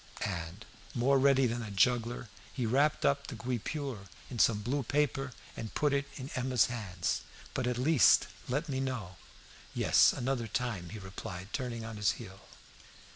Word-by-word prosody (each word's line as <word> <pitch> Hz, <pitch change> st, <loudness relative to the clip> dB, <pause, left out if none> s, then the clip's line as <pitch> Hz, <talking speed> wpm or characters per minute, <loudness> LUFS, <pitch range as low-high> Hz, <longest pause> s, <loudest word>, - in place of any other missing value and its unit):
And, 90 Hz, +2 st, -5 dB, 0.3 s
more 135 Hz, +3 st, +4 dB
ready 135 Hz, 0 st, +5 dB
than 120 Hz, 0 st, -1 dB
a 110 Hz, -, -5 dB
juggler, 120 Hz, +4 st, +1 dB, 0.2 s
he 125 Hz, -, -2 dB
wrapped 140 Hz, +6 st, +2 dB
up 140 Hz, 0 st, +2 dB
the 135 Hz, -, -6 dB
guipure 125 Hz, -1 st, -4 dB, 0.2 s
in 120 Hz, -, -5 dB
some 105 Hz, -2 st, +4 dB
blue 135 Hz, +6 st, 0 dB
paper 135 Hz, 0 st, 0 dB, 0.2 s
and 110 Hz, -, -6 dB
put 150 Hz, -1 st, +2 dB
it 140 Hz, 0 st, 0 dB
in 130 Hz, 0 st, -7 dB
Emma's 130 Hz, -3 st, +3 dB
hands. 100 Hz, -7 st, -2 dB, 0.3 s
"But 125 Hz, -, -1 dB
at 125 Hz, -1 st, 0 dB
least 140 Hz, +2 st, +5 dB, 0.2 s
let 145 Hz, +6 st, 0 dB
me 135 Hz, -3 st, -2 dB
know 120 Hz, -10 st, -3 dB, 0.3 s
" -, -, -20 dB
"Yes, -, -, +6 dB
another 125 Hz, -2 st, -1 dB
time," 110 Hz, -8 st, -2 dB
he 110 Hz, -, -7 dB
replied, 95 Hz, -1 st, -7 dB
turning 120 Hz, -4 st, -3 dB
on 110 Hz, -1 st, -6 dB
his 105 Hz, 0 st, +2 dB
heel. 95 Hz, +1 st, -10 dB
120 Hz, 170 wpm, -32 LUFS, 105-135 Hz, 0.3 s, Yes